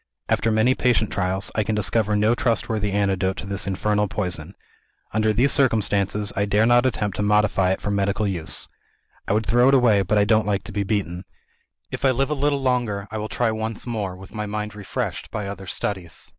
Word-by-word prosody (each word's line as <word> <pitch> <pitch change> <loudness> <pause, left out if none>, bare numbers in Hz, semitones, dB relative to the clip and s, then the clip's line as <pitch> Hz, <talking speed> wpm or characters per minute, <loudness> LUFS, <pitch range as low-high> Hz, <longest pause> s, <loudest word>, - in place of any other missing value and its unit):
"After 115 - +2
many 110 +4 +3
patient 120 -4 +1
trials, 95 +1 -1
I 110 - +1
can 110 +1 -1
discover 105 0 +1
no 105 +2 +3
trustworthy 110 -3 0
antidote 95 -2 0
to - - -6
this 100 0 -1
infernal 105 +2 0
poison. 90 -2 -3 0.6
Under 110 0 +2
these 125 +6 +3
circumstances, 105 -5 +1
I 100 - +1
dare 105 +2 +2
not 120 +2 +4
attempt 105 -6 -2
to - - -1
modify 105 -2 +2
it 95 - -1
for 100 - -2
medical 100 +1 0
use. 85 -5 -3 0.6
I - - +1
would 110 +1 +1
throw 120 +4 +4
it 135 - +5
away 115 -6 +4
but 100 +3 +1
I 105 - +5
don't 110 0 +2
like 100 -2 0
to - - -8
be 100 -1 -2
beaten. 95 -3 -2 0.7
If - - -5
I 135 - +5
live 135 +3 0
a - - +3
little 140 -1 0
longer, 120 -6 0
I 110 - -3
will 105 +1 -4
try 120 -2 0
once 110 0 -4
more, 105 -6 -3
with 95 +1 -13
my 105 -1 -4
mind 105 +1 -4
refreshed 105 -2 -4
by 105 - -4
other 95 -1 -7
studies. 95 -3 -4
105 Hz, 210 wpm, -23 LUFS, 100-110 Hz, 0.7 s, it